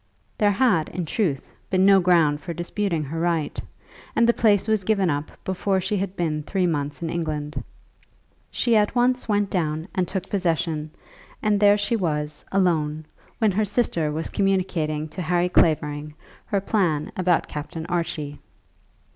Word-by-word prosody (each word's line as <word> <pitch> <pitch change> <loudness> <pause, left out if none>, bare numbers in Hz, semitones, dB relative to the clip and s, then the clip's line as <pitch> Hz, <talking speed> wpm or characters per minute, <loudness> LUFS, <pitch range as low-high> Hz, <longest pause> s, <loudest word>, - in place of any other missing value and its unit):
There 210 - +3
had, 205 -6 +2
in 175 0 -4
truth, 155 - -1 0.2
been 185 0 +3
no 195 -1 +7
ground 165 -5 +3
for 170 -2 -6
disputing 175 -1 -2
her 155 +3 -4
right, 165 -3 -1 0.5
and 230 - +4
the 235 - +5
place 210 -3 +3
was 215 -3 +1
given 195 -4 +2
up 145 +1 -1
to - - -18
her - - -21
before 190 +1 0
she 190 +3 -1
had 195 0 -3
been 155 -3 -1
three 185 +4 -1
months 145 -2 -2
in 165 - -2
England. 155 -3 -3 0.9
She 235 -2 +1
at 210 +2 +2
once 250 0 +2
went 205 -1 +1
down 160 -2 -1
and 185 -2 0
took 190 +1 -4
possession, 165 -5 -1 0.5
and 210 -2 +2
there 205 0 +6
she 205 +3 0
was, 150 -6 -2
alone, 155 -5 +1 0.3
when 220 -2 +3
her 210 +3 +1
sister 195 -8 0
was 160 +2 -4
communicating 175 -6 0
to 185 - -6
Harry 175 +1 +1
Clavering 150 -3 +1 0.3
her 200 - +1
plan 175 -8 0
about 180 -2 +1
Captain 160 +2 -6
Archie. 165 -4 -3
175 Hz, 165 wpm, -24 LUFS, 155-200 Hz, 0.9 s, no